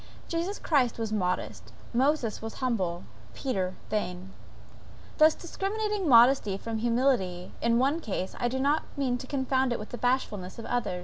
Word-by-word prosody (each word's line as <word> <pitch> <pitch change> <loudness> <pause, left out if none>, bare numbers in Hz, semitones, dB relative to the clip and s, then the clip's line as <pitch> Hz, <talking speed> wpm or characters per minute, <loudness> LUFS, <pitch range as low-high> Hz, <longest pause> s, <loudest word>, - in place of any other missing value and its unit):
Jesus 340 +5 -2
Christ 265 -7 +1
was 225 -2 -3
modest, 185 -3 -2 0.2
Moses 260 -2 +1
was 225 0 -6
humble, 190 -9 -1 0.3
and - - -21
Peter 190 -9 -2 0.2
vain. 185 -3 -3 0.9
Thus 310 0 +7
discriminating 400 +1 -2
modesty 235 -4 +6
from 225 +2 -4
humility 230 -7 +1
in 235 0 +3
one 275 +6 +2
case, 195 - -4
I 240 - +1
do 260 +2 -2
not 285 +4 +2 0.2
mean 255 -3 0
to 260 - -8
confound 265 -1 +1
it 240 - 0
with 210 - -8
bashfulness 215 -7 -1
in 230 - -7
the - - -4
other. 230 -7 -1
245 Hz, 165 wpm, -28 LUFS, 210-275 Hz, 0.9 s, Thus